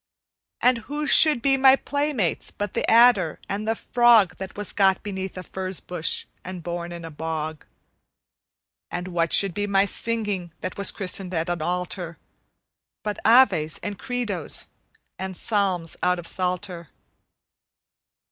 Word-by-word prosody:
And 250 -1 +4
who 300 +1 -2
should 295 -3 +5
be 270 -1 +3
my 265 0 +7
playmates 285 - -2
but 205 -1 -5
the - - -1
adder 225 -8 +5
and 205 +2 -4
the 225 - +1
frog, 235 -6 +4
That 190 +1 -8
was 205 -1 -2
got 195 -2 +2
beneath 190 -2 -5
a 185 - -6
furze 190 0 -5
bush 175 -2 0 0.2
and 180 -2 -7
born 175 0 -5
in 170 -1 -7
a 165 - -8
bog? 155 0 -5 1.2
And 180 +1 -5
what 170 -2 0
should 195 -3 +5
be 205 +3 -2
my 195 0 +3
singing, 205 -5 -3
that - - -4
was 200 - +3
christened 185 -2 -3
at 165 +2 -1
an 175 -2 -2
altar, 175 0 -3 0.9
But 210 -1 -3
Aves 205 -10 +4
and 205 -1 -5
Credos 240 - -4 0.5
and 190 -1 -5
Psalms 190 -6 -1
out 180 0 +2
of 175 - -8
Psalter? 180 -2 -2
190 Hz, 145 wpm, -24 LUFS, 175-220 Hz, 1.2 s, my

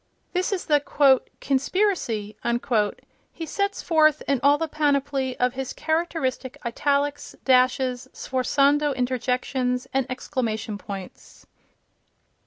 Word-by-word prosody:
This 365 +2 0
is 385 -3 -2
the 295 -1 +4 0.6
"conspiracy" 270 - 0 1.0
he 330 - -6
sets 400 +5 -2
forth 310 -3 +3
in 275 -2 +2
all 285 +1 +5
the 325 +1 -2
panoply 280 -3 0
of 250 0 +2
his 265 -1 -4
characteristic 315 -6 -2
italics, 285 +4 -1
dashes, 255 -1 +2
sforzando 280 +3 +1
interjections 250 0 -1
and 265 -1 +1
exclamation 225 -5 -3
points. 195 -3 -9
270 Hz, 100 wpm, -24 LUFS, 250-295 Hz, 1.0 s, all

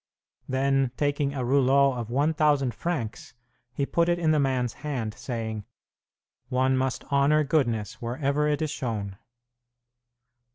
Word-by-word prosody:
Then, 135 0 +2
taking 145 -1 0
a 130 -2 -2
rouleau 135 +1 +4
of 120 -3 -5
1,000 145 -1 +2
francs, 125 -12 -4 0.4
he 140 +3 -1
put 170 +4 +1
it 175 - +2
in 165 -2 +2
the 155 - +3
man's 130 -4 0
hand, 130 -8 -3
saying, 110 -4 -4 0.9
"One 130 0 +2
must 130 -1 -1
honor 140 +2 +4
goodness 120 -8 0
wherever 140 +5 0
it 150 +1 0
is 155 - -2
shown." 105 -8 -4
135 Hz, 130 wpm, -26 LUFS, 120-145 Hz, 0.9 s, rouleau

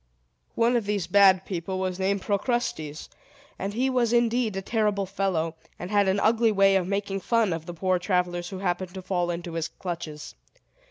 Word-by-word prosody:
One 235 +2 +3
of 230 -4 0
these 205 -4 0
bad 190 0 +5
people 185 0 -4
was 185 -1 -2
named 195 +1 0
Procrustes; 200 - -2 0.5
and 200 +2 -3
he 255 +3 +1
was 250 -3 +1
indeed 235 -2 +2
a 195 - -2
terrible 210 -2 0
fellow, 185 -4 -1 0.2
and 180 +3 -7
had 205 -1 +3
an 190 +1 +2
ugly 225 +1 +3
way 195 -1 +4
of 185 -2 +1
making 200 0 -2
fun 225 -2 +1
of 165 0 -6
the 175 - -5
poor 185 +1 +1
travelers 175 -1 -1
who 190 - -6
happened 185 0 -2
to 190 - -6
fall 180 -2 -1
into 170 0 -4
his 165 -1 -2
clutches. 165 -4 -7
195 Hz, 185 wpm, -26 LUFS, 175-210 Hz, 0.5 s, bad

